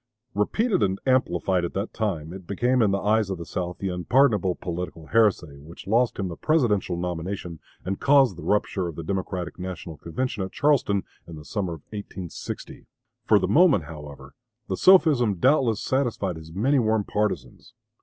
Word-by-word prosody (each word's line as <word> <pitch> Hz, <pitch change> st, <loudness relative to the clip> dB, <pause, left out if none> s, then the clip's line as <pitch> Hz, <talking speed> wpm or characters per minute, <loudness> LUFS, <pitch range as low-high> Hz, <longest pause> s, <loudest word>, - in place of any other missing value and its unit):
Repeated 190 Hz, -, +1 dB
and 95 Hz, 0 st, +1 dB
amplified 95 Hz, -8 st, +1 dB
at 85 Hz, -, -4 dB
that 100 Hz, +3 st, -3 dB
time, 85 Hz, -7 st, -3 dB
it 95 Hz, -2 st, -10 dB
became 120 Hz, +5 st, +1 dB
in 110 Hz, -, +4 dB
the 100 Hz, -, +1 dB
eyes 105 Hz, -1 st, +2 dB
of 95 Hz, -, -3 dB
the 85 Hz, -, -7 dB
South 90 Hz, 0 st, -4 dB
the 100 Hz, -, -3 dB
unpardonable 95 Hz, -, +2 dB
political 85 Hz, -2 st, -6 dB
heresy 95 Hz, -9 st, +1 dB
which 80 Hz, +4 st, -12 dB
lost 115 Hz, +4 st, +2 dB
him 100 Hz, -, -2 dB
the 85 Hz, -, -6 dB
Presidential 105 Hz, -, +1 dB
nomination 90 Hz, -1 st, -4 dB, 0.3 s
and 95 Hz, +1 st, -3 dB
caused 135 Hz, -7 st, +4 dB
the 85 Hz, -, -10 dB
rupture 100 Hz, -3 st, 0 dB
of 85 Hz, -, -6 dB
the 85 Hz, -, -6 dB
Democratic 90 Hz, 0 st, -4 dB
National 90 Hz, -3 st, -6 dB
Convention 110 Hz, +6 st, -3 dB
at 95 Hz, -, -4 dB
Charleston 135 Hz, -9 st, +2 dB, 0.2 s
in 85 Hz, -, -9 dB
the 75 Hz, -1 st, -11 dB
summer 95 Hz, -3 st, -3 dB
of 80 Hz, -, -9 dB
1860. 100 Hz, -4 st, -7 dB, 0.4 s
For -, -, +5 dB
the -, -, 0 dB
moment, 160 Hz, -, +5 dB
however, 75 Hz, -3 st, -10 dB, 0.3 s
the 95 Hz, -, -1 dB
sophism 145 Hz, -, +5 dB
doubtless 125 Hz, -, +2 dB
satisfied 120 Hz, -9 st, -1 dB
his 80 Hz, 0 st, -11 dB
many 130 Hz, -, +2 dB
warm 110 Hz, -2 st, +1 dB
partisans. 105 Hz, +1 st, -3 dB
95 Hz, 175 wpm, -25 LUFS, 85-115 Hz, 0.4 s, For